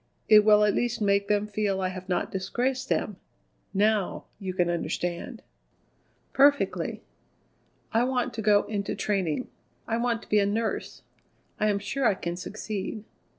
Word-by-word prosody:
It 210 -1 +8
will 210 0 +6
at 210 -1 +3
least 240 0 0
make 200 -1 +2
them 205 0 +2
feel 205 -2 -1
I 185 -1 0
have 185 0 -8
not 180 - -1
disgraced 250 +7 -2
them. 205 - -1 0.5
Now 205 0 +1
you 190 -3 -3
can 180 -1 +1
understand!" 175 0 -3 0.9
"Perfectly." 285 +1 +2 0.9
"I 230 +2 +4
want 255 -1 -1
to 225 - -4
go 205 -1 +4
into 205 -2 -3
training. 195 -1 -1 0.4
I 225 - 0
want 235 -1 0
to - - -16
be 210 - +4
a 200 - +3
nurse. 220 +2 -2 0.6
I 215 - +2
am 205 -1 +2
sure 235 +6 0
I 200 - +3
can 170 -1 -4
succeed." 210 +2 -5
210 Hz, 155 wpm, -27 LUFS, 195-225 Hz, 0.9 s, It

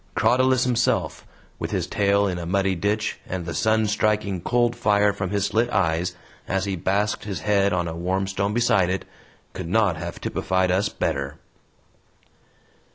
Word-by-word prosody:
Crotalus 130 +3 +3
himself, 120 - 0 0.3
with - - -3
his - - -1
tail 100 0 +2
in 90 -3 -2
a 85 - -5
muddy 95 +1 +1
ditch, 100 +4 -1
and 90 -2 -4
the 85 - -4
sun 110 +5 +2
striking 105 -3 0
cold 120 +3 +1
fire 105 -1 +3
from 95 -2 -3
his 100 0 0
slit 115 +3 +1
eyes 85 -1 0 0.3
as 95 0 0
he 100 -1 -2
basked 100 +5 -1
his 100 -5 -4
head 100 -1 +2
on 90 -1 0
a 80 - -4
warm 95 +3 -1
stone 95 +1 -1
beside 115 -7 +3
it, 95 +1 -2 0.5
could - - -6
not 100 -4 +2
have 85 +1 -6
typified 95 -1 0
us 100 +3 +1
better. 70 -3 -2
100 Hz, 165 wpm, -24 LUFS, 90-105 Hz, 0.5 s, Crotalus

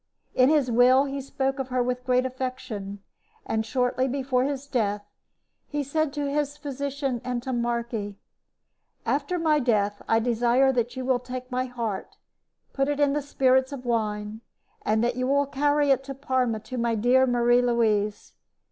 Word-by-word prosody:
In 255 +1 +5
his 290 -5 +2
will 250 +3 +5
he 275 0 -4
spoke 270 0 -2
of 265 - -2
her 250 -1 0
with 250 +1 -3
great 250 0 +3
affection, 255 -6 -5 0.4
and 220 0 -1
shortly 250 +2 0
before 260 -1 0
his 280 -1 -3
death 210 -6 -1 0.6
he 295 -1 -2
said 310 +2 0
to 290 -1 -2
his 290 0 -1
physician, 280 -3 -3
Antommarchi: 235 -4 -2 0.9
"After 290 +6 0
my 315 -3 +2
death, 210 -5 +1
I 225 - +4
desire 240 +3 +3
that 240 -1 -1
you 260 -1 -4
will 255 -1 +2
take 250 +1 -7
my 255 +1 0
heart, 230 -6 -5 0.6
put 275 0 0
it 290 0 -1
in 285 -1 +3
the 295 - 0
spirits 265 -1 +2
of 265 -3 -7
wine, 215 -2 -2 0.4
and 220 +1 +1
that 240 +1 0
you 275 +2 +1
carry 290 +1 +2
it 270 0 +2
to 275 0 -6
Parma 255 -5 0
to 255 +2 -6
my 235 -1 +1
dear 250 +4 +4
Marie 240 0 +3
Louise. 220 -4 0
255 Hz, 165 wpm, -26 LUFS, 235-275 Hz, 0.9 s, In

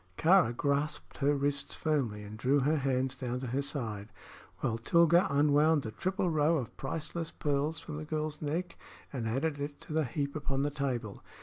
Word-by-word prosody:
Kāra 165 -8 +4
grasped 145 +1 -1
her 145 0 +3
wrists 140 0 -1
firmly 130 -10 -1
and 105 +1 -8
drew 135 +6 +2
her 150 +4 +2
hands 130 -1 0
down 125 -2 -3
to - - -4
her 130 +3 -1
side, 110 -8 -3 0.5
while 115 0 0
Tilga 170 - +5
unwound 145 +1 +4
the 110 - -4
triple 185 - -1
row 155 +1 +3
of 125 -6 -5
priceless 165 +1 -3
pearls 145 +2 -1
from 155 -2 -7
the 155 - -5
girl's 155 0 -3
neck 170 +4 -3 0.3
and 120 -4 -2
added 145 +6 -1
it 145 0 -5
to - - -7
the 155 -1 +2
heap 140 +3 -3
upon 140 -2 -1
the 145 - 0
table. 125 -7 -3
145 Hz, 185 wpm, -31 LUFS, 130-155 Hz, 0.5 s, Tilga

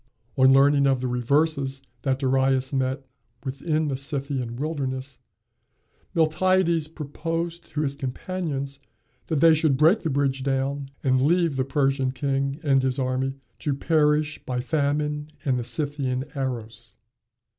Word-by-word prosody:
On 130 0 +6
learning 140 +1 +5
the 135 -1 +4
reverses 135 +2 0 0.2
that 135 -2 0
Darius 135 0 +1
met 135 +1 -1 0.4
with 135 0 -5
in 155 -2 0
the 140 - -1
Scythian 135 -3 -3
wilderness, 135 -2 -4 1.0
Miltiades 170 0 +2
proposed 165 +2 -4
to 150 -1 -3
his 140 -2 0
companions 140 0 -4 0.5
that 155 -4 0
they 165 -1 +7
should 155 -3 +2
break 160 +9 +5
the 160 - -2
bridge 135 -1 0
down 135 +1 -1
and 130 -1 +3
leave 165 +1 +2
the 130 - +1
Persian 135 -1 +1
king 135 +1 -1
and 135 -3 +3
his 130 0 0
army 130 0 -1 0.2
to 145 -3 -1
perish 150 0 +1
by 125 -1 -2
famine 150 +1 -1 0.2
and 130 -3 +1
the - - -3
Scythian 135 -2 -1
arrows. 115 -4 -5
140 Hz, 135 wpm, -25 LUFS, 130-155 Hz, 1.0 s, they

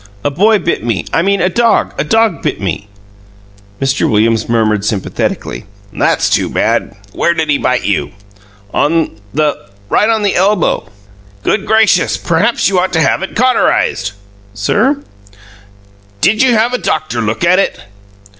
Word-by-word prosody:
A 145 - 0
boy 210 +9 +3
bit 170 - -2
me 115 -7 -2
I - - +3
mean 195 +1 +1
a 180 - +3
dog 230 +5 +1
a - - -1
dog 225 +7 +1
bit - - -2
me." 100 +1 -4 0.9
Mr. 135 0 0
Williams 110 +1 +1
murmured 110 -3 +1
sympathetically: 105 -2 -3 0.3
"That's - - +1
too - - +1
bad! - - 0 0.2
Where 170 - +1
did 160 -2 -1
he 140 - +1
bite 125 0 0
you?" 75 -8 -1 0.6
"On 155 -8 0
the 150 -8 -1 0.2
right 210 - +2
on 220 -2 +1
the 200 - +1
elbow." 190 - +1 0.5
"Good 215 - 0
gracious! 215 -6 +3
Perhaps 185 +8 +1
you 190 -2 +2
ought 185 0 -1
to 160 - +2
have 145 +3 +2
it 190 - -6
cauterized." 230 - +1 0.4
"Sir?" 255 - 0 1.2
"Did 215 - +2
you 255 -3 +4
have 230 +3 +1
a 250 - 0
doctor 120 -7 -2
look 110 +6 -2
at 180 +2 +4
it?" 195 - -1
170 Hz, 155 wpm, -13 LUFS, -, 1.2 s, you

